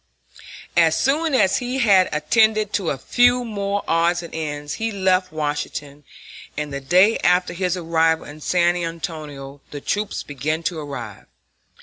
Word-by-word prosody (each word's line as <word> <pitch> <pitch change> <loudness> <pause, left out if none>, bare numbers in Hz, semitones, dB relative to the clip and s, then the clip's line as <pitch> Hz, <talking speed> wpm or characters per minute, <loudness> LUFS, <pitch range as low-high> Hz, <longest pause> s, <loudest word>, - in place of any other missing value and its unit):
As 165 -2 +4
soon 295 +2 +1
as 190 -6 +3
he 250 +1 -3
had 200 -7 +4
attended 215 +6 +2
to 195 -5 0
a 140 - -2
few 245 - +3
more 200 -2 -2
odds 170 +1 +2
and 170 - -10
ends 145 -2 -4
he 225 0 0
left 185 -2 +1
Washington, 145 -1 -4 0.5
and 150 -2 -4
the 140 - -4
day 185 +10 +4
after 180 0 +2
his 180 0 -1
arrival 165 -1 +1
in 150 +1 -11
San 175 +2 +2
Antonio 155 -5 -6
the 145 - -7
troops 205 +8 -2
began 155 +3 -3
to 165 0 -2
arrive. 130 -8 -8
170 Hz, 150 wpm, -21 LUFS, 150-200 Hz, 0.5 s, As